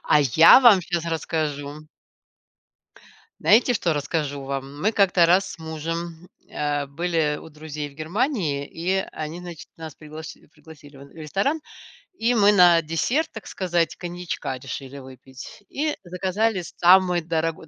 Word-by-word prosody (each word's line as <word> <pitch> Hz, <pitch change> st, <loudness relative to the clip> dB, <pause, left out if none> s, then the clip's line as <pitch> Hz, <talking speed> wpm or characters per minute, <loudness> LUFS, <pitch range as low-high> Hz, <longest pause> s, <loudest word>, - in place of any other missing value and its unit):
А 150 Hz, -, +4 dB
я 150 Hz, -, +7 dB
вам 235 Hz, -7 st, +7 dB
щас 170 Hz, -1 st, -3 dB
расскажу 155 Hz, -2 st, -4 dB, 1.6 s
знаете, 245 Hz, +4 st, +4 dB
что 175 Hz, -6 st, 0 dB
расскажу 145 Hz, -1 st, -3 dB
вам? 135 Hz, +1 st, -6 dB
Мы 210 Hz, +7 st, +1 dB
как-то 195 Hz, -5 st, +4 dB
раз 180 Hz, +3 st, +2 dB
с -, -, -11 dB
мужем, 165 Hz, +2 st, -6 dB, 0.2 s
а, 145 Hz, -1 st, -1 dB
были 155 Hz, 0 st, -1 dB
у 160 Hz, -, -12 dB
друзей 150 Hz, -1 st, -7 dB
в 140 Hz, -, -20 dB
Германии, 160 Hz, -, -2 dB
и 180 Hz, +4 st, -2 dB, 0.2 s
они, 155 Hz, +2 st, -6 dB
значит, 175 Hz, -3 st, -10 dB
нас 160 Hz, -3 st, -9 dB
пригласи 155 Hz, 0 st, -11 dB
пригласили 150 Hz, -1 st, -16 dB
в -, -, -14 dB
н 140 Hz, -, -12 dB
в -, -, -22 dB
ресторан, 195 Hz, -, -1 dB, 0.6 s
и 235 Hz, +2 st, +1 dB
мы 205 Hz, -3 st, +5 dB
на 175 Hz, -4 st, +6 dB
десерт, 230 Hz, -, -1 dB
так 220 Hz, -, -10 dB
сказать, 175 Hz, -3 st, -1 dB
коньячка 175 Hz, -6 st, -5 dB
решили 135 Hz, +2 st, -8 dB
выпить. 130 Hz, +5 st, -12 dB
И 300 Hz, +2 st, -2 dB
заказали 185 Hz, +3 st, -1 dB
самый 180 Hz, 0 st, +5 dB
дорогой, 165 Hz, -1 st, -3 dB
165 Hz, 145 wpm, -23 LUFS, 150-185 Hz, 1.6 s, я